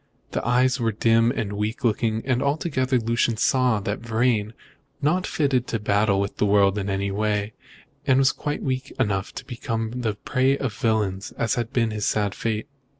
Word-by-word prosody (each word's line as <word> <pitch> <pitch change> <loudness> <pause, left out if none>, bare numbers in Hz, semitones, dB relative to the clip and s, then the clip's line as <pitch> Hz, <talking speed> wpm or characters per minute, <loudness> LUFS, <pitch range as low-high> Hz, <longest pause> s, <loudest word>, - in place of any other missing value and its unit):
The - - -2
eyes 130 +2 +2
were 115 -1 +1
dim 115 +2 +3
and 115 -5 -2
weak 105 +2 -3
looking, 110 -1 +1
and 130 -1 +1
altogether 140 -3 0
Lucian 115 0 +1
saw 125 -2 +2
that 100 +2 -3
Vrain 115 -1 +1
was 110 - -13 0.5
not 175 +6 +1
fitted 135 -5 +1
to 115 - -2
battle 105 -1 +2
with 100 0 -2
the - - +2
world 100 0 +4
in 100 0 -3
any 100 0 -1
way, 105 +1 -1 0.5
and 135 0 +4
quite 145 0 -3
weak 130 0 -2
enough 100 -6 0
to 135 - -7
become 115 -3 -3
the 110 -3 -1
prey 130 +3 +1
of 130 -6 -3
villains, 100 -3 -1
as 115 - 0
had 120 0 -2
been 115 -4 +1
his 105 -1 -2
sad 105 -2 0
fate. 110 -1 -2
115 Hz, 185 wpm, -24 LUFS, 105-130 Hz, 0.5 s, world